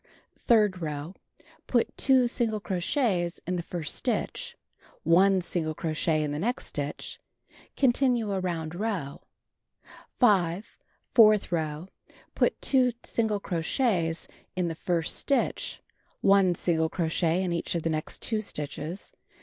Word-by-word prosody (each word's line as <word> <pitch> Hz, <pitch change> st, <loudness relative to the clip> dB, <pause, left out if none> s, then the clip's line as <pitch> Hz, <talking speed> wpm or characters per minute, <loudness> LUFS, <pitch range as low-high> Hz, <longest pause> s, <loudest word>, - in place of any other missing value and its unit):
Third 210 Hz, -6 st, +4 dB
row: 150 Hz, +2 st, -4 dB, 0.5 s
Put 240 Hz, -2 st, +1 dB
2 260 Hz, -2 st, +4 dB
single 235 Hz, -3 st, 0 dB
crochets 185 Hz, -, -1 dB
in 180 Hz, +2 st, -1 dB
the 175 Hz, -, -1 dB
first 170 Hz, -3 st, -4 dB
stitch, -, -, -2 dB, 0.5 s
1 185 Hz, +3 st, +4 dB
single 160 Hz, -3 st, -2 dB
crochet 155 Hz, -1 st, 0 dB
in 150 Hz, -, -2 dB
the 145 Hz, -, -3 dB
next 240 Hz, +8 st, -1 dB
stitch. 145 Hz, 0 st, -5 dB, 0.6 s
Continue 245 Hz, -4 st, +2 dB
around 175 Hz, -4 st, -2 dB
row. 180 Hz, -8 st, -3 dB, 1.0 s
5. 195 Hz, -4 st, +2 dB, 0.3 s
Fourth 215 Hz, -5 st, +6 dB
row: 160 Hz, 0 st, -2 dB, 0.5 s
Put -, -, +1 dB
2 255 Hz, -3 st, +3 dB
single 220 Hz, -3 st, 0 dB
crochets 170 Hz, -1 st, 0 dB, 0.3 s
in 180 Hz, -2 st, 0 dB
the -, -, -3 dB
first 165 Hz, 0 st, -1 dB
stitch, 280 Hz, -, -1 dB, 0.4 s
1 195 Hz, -2 st, +4 dB
single 160 Hz, -2 st, +1 dB
crochet 165 Hz, +1 st, 0 dB
in 180 Hz, -2 st, -1 dB
each 170 Hz, -, -2 dB
of 170 Hz, -, -1 dB
the 165 Hz, -, 0 dB
next 155 Hz, 0 st, -4 dB
2 220 Hz, -2 st, 0 dB
stitches. 155 Hz, 0 st, -6 dB
180 Hz, 125 wpm, -27 LUFS, 165-215 Hz, 1.0 s, Fourth